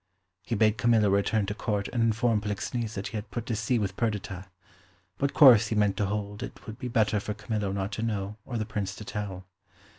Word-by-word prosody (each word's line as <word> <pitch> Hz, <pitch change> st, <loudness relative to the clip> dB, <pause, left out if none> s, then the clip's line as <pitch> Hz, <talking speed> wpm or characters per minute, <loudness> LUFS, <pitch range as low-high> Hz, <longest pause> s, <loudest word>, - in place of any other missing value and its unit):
He 115 Hz, +5 st, -3 dB
bade 110 Hz, +1 st, +3 dB
Camillo 115 Hz, -4 st, +4 dB
return 100 Hz, +1 st, +2 dB
to 100 Hz, -, -3 dB
Court 105 Hz, -1 st, -2 dB
and 120 Hz, -, -1 dB
inform 115 Hz, -1 st, +2 dB
Polixenes 105 Hz, +2 st, -3 dB
that 100 Hz, 0 st, -4 dB
he 110 Hz, -, -4 dB
had 105 Hz, -, -6 dB
put 120 Hz, -2 st, -4 dB
to 115 Hz, -, -2 dB
sea 115 Hz, +4 st, +1 dB
with 100 Hz, -3 st, -2 dB
Perdita; 100 Hz, -4 st, -3 dB, 0.7 s
what 140 Hz, 0 st, 0 dB
course 120 Hz, -7 st, +8 dB
he 110 Hz, -, -2 dB
meant 105 Hz, -2 st, +2 dB
to 100 Hz, -, +1 dB
hold 105 Hz, 0 st, -3 dB
it -, -, -8 dB
would 110 Hz, +2 st, -8 dB
be 125 Hz, -, -4 dB
better 110 Hz, -3 st, +2 dB
for 105 Hz, +1 st, -4 dB
Camillo 105 Hz, -2 st, -2 dB
not 100 Hz, +1 st, -2 dB
to 110 Hz, -, -4 dB
know 105 Hz, -3 st, -2 dB
or 120 Hz, 0 st, -4 dB
the 110 Hz, -, -1 dB
Prince 105 Hz, -3 st, -3 dB
to 105 Hz, -, -9 dB
tell. 100 Hz, -3 st, -5 dB
105 Hz, 220 wpm, -28 LUFS, 100-115 Hz, 0.7 s, course